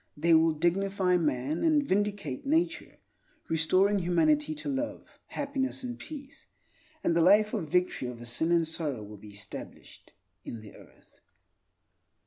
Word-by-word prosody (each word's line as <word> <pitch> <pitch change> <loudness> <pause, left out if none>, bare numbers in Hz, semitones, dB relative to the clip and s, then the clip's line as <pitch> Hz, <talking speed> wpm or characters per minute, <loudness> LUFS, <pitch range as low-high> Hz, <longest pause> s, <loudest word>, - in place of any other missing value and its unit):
They 165 +3 +3
will 160 0 +5
dignify 185 +3 +1
man, 150 -1 -1
and 310 -3 +4
vindicate 200 -8 -1
nature, 320 +5 0 0.5
restoring 185 +6 +3
humanity 300 - +2
to 295 - -7
love, 285 +1 -3 0.2
happiness, 275 -2 -2
and 245 -1 -5
peace; 285 -3 -10 0.6
and 170 - +2
the 170 - +4
life 210 +5 +5
of 155 - -2
victory 180 -7 +1
over 120 -1 -8
sin 140 +8 0
and 170 -2 +3
sorrow 150 -8 -3
will 105 0 -10
be 105 +1 -13
established 100 0 -10 0.3
in 115 - -7
the 105 - -13
earth. - - -19
180 Hz, 140 wpm, -29 LUFS, 155-255 Hz, 0.6 s, will